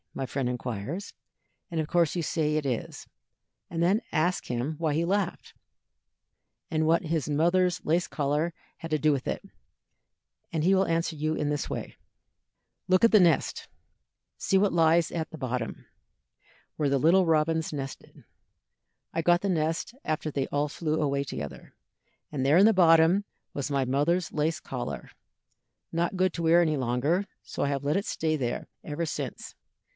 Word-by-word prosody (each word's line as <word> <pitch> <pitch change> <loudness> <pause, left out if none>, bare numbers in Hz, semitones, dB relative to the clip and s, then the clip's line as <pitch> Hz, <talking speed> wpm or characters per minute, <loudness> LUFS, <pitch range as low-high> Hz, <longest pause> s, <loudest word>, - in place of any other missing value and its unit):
my 135 - -2
friend 130 -1 -2
inquires, 125 - -4 0.6
and 170 - -2
of 155 - -1
course 170 -1 +2
you 170 - -1
say 155 -1 0
it 155 -2 -1
is, 125 -4 -4 0.6
and 165 0 -3
then 190 +6 +3
ask 175 +4 0
him 125 +6 -2
why 160 -2 0
he 165 +3 +1
laughed, 190 0 -2 1.2
and 155 -1 +1
what 165 +3 +3
his 160 -3 -1
mother's 175 +3 +2
lace 170 +3 +1
collar 150 +3 0 0.3
had 165 - -8
to 155 - +3
do 155 +1 +3
with 135 -3 -2
it, - - -2 1.1
and 160 -2 -1
he 190 +3 +4
will 190 0 +2
answer 165 0 0
you 155 +1 -1
in 145 - -1
this 145 -1 -2
way: - - -5 0.9
"Look 185 +2 +3
in 230 - +6
the 215 - +7
nest. 170 -4 +2 0.7
See 195 - +1
what 200 -1 +2
lies 165 0 +4
on 165 -2 -2
the 160 - -9
bottom, 125 -4 -4 0.9
where 145 -2 0
the 140 - +2
little 175 +7 +4
robins 160 0 +1
nestled. 135 -2 -7 0.9
I 165 - 0
got 175 +2 +3
the 200 - -1
nest 165 +4 -1
after 155 0 -2
they 135 -1 -1
all 145 +1 0
flew 155 +1 -2
away 140 -2 0
together, 75 - -7 0.6
and 140 -3 -2
there 145 +4 +5
in 195 - +7
the 225 - +6
bottom 170 +1 +5 0.3
was 140 0 -3
my 135 -2 +1
mother's 150 +7 +1
lace 155 +2 0
collar, - - -6 0.8
not 170 +3 -1
good 185 -1 +2
to 170 - -4
wear 165 +2 +5
any 155 -3 +2
longer, 135 +9 0 0.2
so - - -4
I 140 - +1
have 140 -1 -2
let 150 +2 +1
it 200 - -2
stay 155 -1 0
there 125 -5 -3 0.2
ever 160 +2 -3
since. 155 - -5
160 Hz, 170 wpm, -28 LUFS, 145-170 Hz, 1.2 s, the